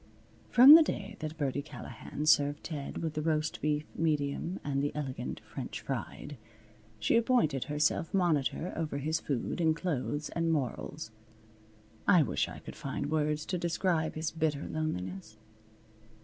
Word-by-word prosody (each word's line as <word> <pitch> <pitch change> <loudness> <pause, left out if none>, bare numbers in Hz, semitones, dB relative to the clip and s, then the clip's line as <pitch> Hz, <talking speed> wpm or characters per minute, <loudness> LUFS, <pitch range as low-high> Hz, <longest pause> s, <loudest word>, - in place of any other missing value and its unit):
From 255 +4 +10
the 325 - +11
day 210 -8 -2
that 155 0 -5
Birdie 140 -2 -1
Callahan 140 0 -7
served 145 -1 +3
Ted 150 0 -5
with 160 -2 -2
the 155 - -2
roast 155 0 -1
beef 150 0 0
medium 155 +2 -1
and 140 -1 -1
the 145 - 0
elegant 140 -4 -4
French - - -7
fried, 145 - -5 0.6
she 110 - +1
appointed 230 - +2
herself 155 +2 0
monitor 175 -2 +1
over 155 -3 -2
his 155 +3 -1
food 140 +4 -2
and 160 -1 +3
clothes 150 -3 -2
and 165 -1 0
morals. 145 -2 -3 1.0
I 175 -4 +6
wish 130 - -1
I - - -8
could - - -10
find 145 - -4
words 150 -1 0
to 180 - -2
describe 170 -1 0
his 155 0 -2
bitter 155 -3 -1
loneliness. 110 -8 -4
155 Hz, 150 wpm, -31 LUFS, 145-165 Hz, 1.0 s, the